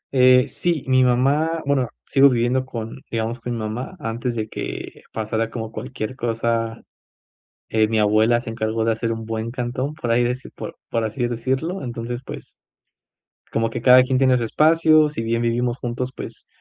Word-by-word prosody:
Eh, 125 Hz, 0 st, +6 dB
sí, 170 Hz, -5 st, -1 dB
mi 130 Hz, 0 st, +4 dB
mamá 140 Hz, +6 st, +2 dB
bueno, 135 Hz, -4 st, +1 dB, 0.2 s
sigo 140 Hz, 0 st, +5 dB
viviendo 125 Hz, +2 st, +1 dB
con 115 Hz, +1 st, -6 dB
digamos, 115 Hz, +1 st, -2 dB
con 120 Hz, +1 st, -3 dB
mi -, -, -3 dB
mamá 115 Hz, -, -4 dB
antes 115 Hz, +2 st, -3 dB
de 110 Hz, -2 st, -2 dB
que -, -, -6 dB
pasara 110 Hz, +1 st, -2 dB
como 110 Hz, -2 st, -5 dB
cualquier 110 Hz, +3 st, -5 dB
cosa, 115 Hz, -1 st, -1 dB, 0.9 s
eh, 110 Hz, -1 st, +3 dB
mi 110 Hz, -, 0 dB
abuela 110 Hz, +3 st, +3 dB
se 120 Hz, -, -7 dB
encargó 110 Hz, 0 st, -1 dB
de 115 Hz, -, +2 dB
hacer 115 Hz, +1 st, -1 dB
un 115 Hz, 0 st, -6 dB
buen 115 Hz, +1 st, -3 dB
cantón 125 Hz, +3 st, -3 dB
por 120 Hz, -6 st, -3 dB
ahí 120 Hz, -, +4 dB
deci 125 Hz, +2 st, -3 dB
por -, -, -8 dB
por 115 Hz, -1 st, 0 dB
así 120 Hz, +3 st, -2 dB
decirlo, 130 Hz, +10 st, -2 dB
entonces, 120 Hz, 0 st, -5 dB
pues, -, -, -9 dB, 1.0 s
como 115 Hz, 0 st, +1 dB
que 115 Hz, 0 st, -5 dB
cada 125 Hz, 0 st, +8 dB
quien 130 Hz, 0 st, 0 dB
tiene 130 Hz, -1 st, +4 dB
su 120 Hz, -, -1 dB
espacio. 155 Hz, +4 st, +4 dB
Si 145 Hz, -, -4 dB
bien 115 Hz, +1 st, 0 dB
vivimos 120 Hz, +1 st, 0 dB
juntos, 125 Hz, +1 st, -4 dB
pues -, -, -8 dB
120 Hz, 180 wpm, -22 LUFS, 115-130 Hz, 1.0 s, cada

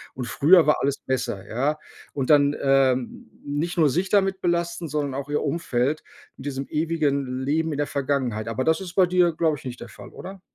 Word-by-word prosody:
und 125 Hz, -, -4 dB
früher 165 Hz, +7 st, +5 dB
war 150 Hz, -, +4 dB
alles 140 Hz, 0 st, 0 dB
besser“, 120 Hz, -7 st, -2 dB
ja? 140 Hz, +6 st, -1 dB, 0.4 s
Und 135 Hz, -1 st, -3 dB
dann, 145 Hz, 0 st, +5 dB
ähm, 135 Hz, -2 st, +1 dB, 0.2 s
nicht 155 Hz, +5 st, -3 dB
nur 155 Hz, -3 st, +4 dB
sich 185 Hz, +6 st, -1 dB
damit 195 Hz, -2 st, +2 dB
belasten, 170 Hz, -1 st, -1 dB
sondern 145 Hz, -2 st, -2 dB
auch 140 Hz, +1 st, -5 dB
ihr 150 Hz, -, 0 dB
Umfeld 145 Hz, -2 st, -1 dB, 0.3 s
in 130 Hz, -, -10 dB
diesem 135 Hz, -1 st, -4 dB
ewigen 140 Hz, -5 st, -1 dB
Leben 160 Hz, +2 st, 0 dB
in -, -, -4 dB
der 145 Hz, -, 0 dB
Vergangenheit. 130 Hz, -6 st, -2 dB
Aber 115 Hz, +3 st, -2 dB
das 160 Hz, +5 st, +1 dB
ist 180 Hz, -2 st, -8 dB
bei 190 Hz, -2 st, +6 dB
dir, 175 Hz, -2 st, +2 dB
glaube 160 Hz, -2 st, +1 dB
ich, -, -, -16 dB
nicht 125 Hz, -1 st, -6 dB
der -, -, -7 dB
Fall, -, -, -12 dB
oder? 190 Hz, 0 st, -10 dB
145 Hz, 205 wpm, -24 LUFS, 130-165 Hz, 0.4 s, bei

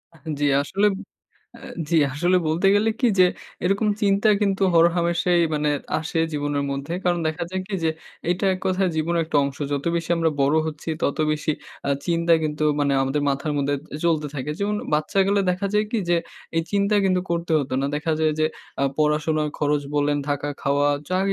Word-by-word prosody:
আ -, -, -17 dB, 0.2 s
জি 145 Hz, -, +1 dB, 0.2 s
আসলে 200 Hz, +7 st, +1 dB, 0.7 s
এ -, -, -14 dB, 0.3 s
জি 170 Hz, -, +2 dB, 0.2 s
আসলে 175 Hz, +5 st, +2 dB
বলতে 165 Hz, +5 st, +1 dB
গেলে 210 Hz, +2 st, +3 dB
কি 250 Hz, -, +4 dB
যে 185 Hz, -, +8 dB, 0.4 s
এরকম 200 Hz, +4 st, +2 dB
চিন্তা 200 Hz, +1 st, +3 dB
কিন্তু 195 Hz, -1 st, +1 dB
হরহামেশাই 170 Hz, +1 st, +3 dB
মানে 150 Hz, 0 st, +1 dB, 0.3 s
আসে 160 Hz, +1 st, -3 dB
জীবনের 145 Hz, -1 st, -1 dB
মধ্যে। 140 Hz, +4 st, -4 dB
কারণ 175 Hz, -1 st, +1 dB
দেখা 160 Hz, +2 st, -3 dB
যায় 190 Hz, -, -2 dB
কি 200 Hz, -, -4 dB
যে 160 Hz, -, +3 dB, 0.4 s
এটা 180 Hz, +3 st, 0 dB
এক 185 Hz, -, -6 dB
কথায় 190 Hz, 0 st, +1 dB
জীবনের 165 Hz, +2 st, +1 dB
একটা 155 Hz, -, -1 dB
অংশ। 140 Hz, -1 st, -5 dB
যত 140 Hz, -1 st, -2 dB
বেশি 165 Hz, 0 st, -4 dB
আমরা 165 Hz, -1 st, +2 dB
বড় 140 Hz, +3 st, +3 dB
হচ্ছি 155 Hz, +1 st, -6 dB
তত 140 Hz, -, 0 dB
বেশি 155 Hz, 0 st, -1 dB, 0.3 s
আ -, -, +1 dB, 0.2 s
চিন্তা 170 Hz, 0 st, +2 dB
কিন্তু 155 Hz, 0 st, -1 dB, 0.2 s
মানে 140 Hz, -1 st, +2 dB
আমাদের 140 Hz, +2 st, -1 dB
মাথার 140 Hz, +2 st, -1 dB
মধ্যে 140 Hz, +1 st, 0 dB, 0.3 s
চলতে 155 Hz, -3 st, +2 dB
থাকে। 145 Hz, +1 st, -3 dB
যেমন 205 Hz, +1 st, 0 dB, 0.2 s
বাচ্চাকালে 195 Hz, +6 st, +2 dB
দেখা 185 Hz, +3 st, -1 dB
যায় 210 Hz, -, +3 dB
কি 230 Hz, -, 0 dB
যে 175 Hz, -, +4 dB, 0.4 s
এই 165 Hz, -, +3 dB
চিন্তা 200 Hz, +1 st, +2 dB
কিন্তু 185 Hz, -1 st, +2 dB
করতে 170 Hz, -1 st, -1 dB
হতো 135 Hz, -3 st, -3 dB
না। 140 Hz, -, 0 dB
দেখা 155 Hz, +2 st, -1 dB
যায় 155 Hz, -1 st, +3 dB
যে 155 Hz, -, +4 dB, 0.3 s
আ -, -, +1 dB, 0.2 s
পড়াশোনার 150 Hz, 0 st, +1 dB
খরচ 145 Hz, -1 st, +1 dB
বলেন 145 Hz, 0 st, +1 dB
থাকা 145 Hz, 0 st, -1 dB
খাওয়া 145 Hz, +1 st, +2 dB, 0.2 s
যা 185 Hz, 0 st, 0 dB
160 Hz, 190 wpm, -23 LUFS, 145-185 Hz, 0.7 s, যে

